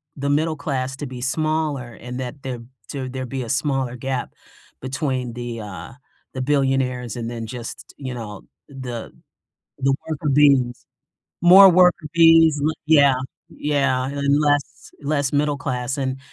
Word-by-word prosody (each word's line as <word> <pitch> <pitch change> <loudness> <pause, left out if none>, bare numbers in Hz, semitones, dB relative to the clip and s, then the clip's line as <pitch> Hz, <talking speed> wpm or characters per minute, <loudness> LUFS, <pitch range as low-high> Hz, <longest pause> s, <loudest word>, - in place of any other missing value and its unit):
the 140 0 -2
middle 155 +2 +1
class 135 -3 -3
to 145 - -5
be 125 -1 -8
smaller 150 -2 -1
and 125 +2 -8
that 130 +2 -6
there 130 -2 -4 0.3
to 130 -2 -4
there'd 130 -1 -5
be 135 0 -3
a 115 - -8
smaller 135 -2 -1
gap 130 0 -3 0.5
between 130 -2 -2
the, 120 -1 -5
uh, 95 -5 -8 0.4
the 130 - -4
billionaires 130 -4 0
and 115 -1 -4
then 115 -1 -5
just, 120 0 -8
you 130 -3 -5
know, 105 -5 -7 0.3
the 125 -4 -7 0.7
the 135 0 +2
worker 155 -1 -3
bees. 135 -4 +3 0.6
More 190 +3 +9
worker 180 -2 +4
bees, 165 -2 +6
le 155 +2 +1
yeah, 140 -4 +5 0.3
yeah, 140 -3 0
and 140 0 +1
less 145 -1 -1
less 145 -1 0
middle 145 0 +1
class, 130 -1 -3
and 130 -1 -2
135 Hz, 150 wpm, -22 LUFS, 125-145 Hz, 0.7 s, More